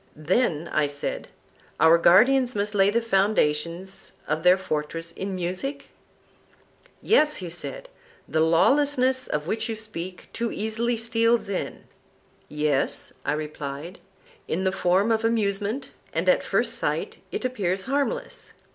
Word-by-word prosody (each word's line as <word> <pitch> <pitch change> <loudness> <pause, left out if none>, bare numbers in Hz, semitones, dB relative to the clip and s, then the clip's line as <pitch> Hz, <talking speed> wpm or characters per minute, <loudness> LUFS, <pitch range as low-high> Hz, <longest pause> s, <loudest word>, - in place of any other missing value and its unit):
Then, 165 0 0
I 150 -1 +1
said, 145 0 -3 0.5
our 160 +2 +6
guardians 245 +9 +5
must 205 +1 -1
lay 195 -1 +4
the 230 +3 +1
foundations 190 -3 0
of 155 +1 -1
their 180 +2 +6
fortress 165 -1 -4
in 190 +2 -5
music? 185 +11 -4 1.1
Yes, 305 -9 +4
he 180 -3 -6
said; - - -3 0.4
the 160 - 0
lawlessness 260 - +3
of 150 0 -2
which 220 +5 -2
you 225 - -2
speak 185 -5 -7
too 235 0 -2
easily 225 +3 -1
steals 230 -1 +2
in. 195 - -4 0.7
Yes, 150 -2 0
I - - 0
replied, 150 +2 -6 0.5
in 180 +4 -1
the 190 - +2
form 190 +3 +2
of 225 0 +1
amusement; 215 +1 0 0.2
and - - -1
at - - +5
first - - 0
sight - - -2
it - - -3
appears 190 -7 -1
harmless. 285 - -3
195 Hz, 135 wpm, -25 LUFS, 165-230 Hz, 1.1 s, our